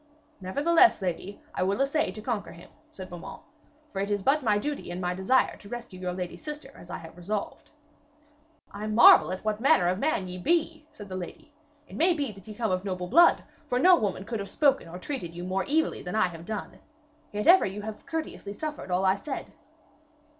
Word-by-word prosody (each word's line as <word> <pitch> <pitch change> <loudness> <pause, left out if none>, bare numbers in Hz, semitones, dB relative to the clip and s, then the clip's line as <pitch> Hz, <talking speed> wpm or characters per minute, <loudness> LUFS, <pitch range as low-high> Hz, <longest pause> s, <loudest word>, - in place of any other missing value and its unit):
'Nevertheless, 330 - +4
lady, 185 +1 -4
I - - -3
will 195 +4 +1
essay 280 +3 +1
to 215 - -9
conquer 220 -4 -3
him,' 170 - -15 0.2
said 185 -1 -9
Beaumains, 175 -2 -9 0.5
'for 195 - -3
it 200 +1 -1
is 205 -1 -1
but 285 +7 +3
my 215 -5 +2
duty 290 +2 -4
and 175 +1 -5
my 180 -1 -1
desire 190 +8 +2
to 200 - -14
rescue 235 -6 -7
your 180 -1 -3
lady 180 -1 -5
sister 300 -3 -8
as 175 - -14
I - - -4
have 160 0 -12
resolved.' 200 +4 -5 1.0
'I 210 +1 -5
marvel 240 - +7
what 215 0 -1
manner 210 -8 +4
of 185 +2 0
man 245 -10 0
ye 180 0 -7
be,' 320 - 0
said 205 - -11
the 185 - -6
lady. 185 - -8 0.3
'It - - -11
must 340 +2 +3
be 280 -5 -1
that 195 -1 -15
ye 215 - -8
come 225 -2 -1
of 185 0 0
noble 180 -2 -4
blood, 340 +7 +6 0.2
for 245 - 0
no 360 +8 +7
woman 200 - -2
could 225 0 -4
have 200 - -5
spoken 275 - +2
or 170 +2 -8
treated 185 - -5
you 175 - -6
more 190 +1 -1
evilly 320 +2 +1
than 180 - -5
I 215 -4 +3
have 165 -1 -10
done. 215 -2 -5 0.5
Yet 210 0 -3
ever 365 - +7
you 200 +2 -6
have 215 0 -8
courteously 315 -10 -5
suffered 300 -2 -6
all 180 +1 +1
I 190 - +5
said.' 270 +8 -6
205 Hz, 210 wpm, -27 LUFS, 185-280 Hz, 1.0 s, marvel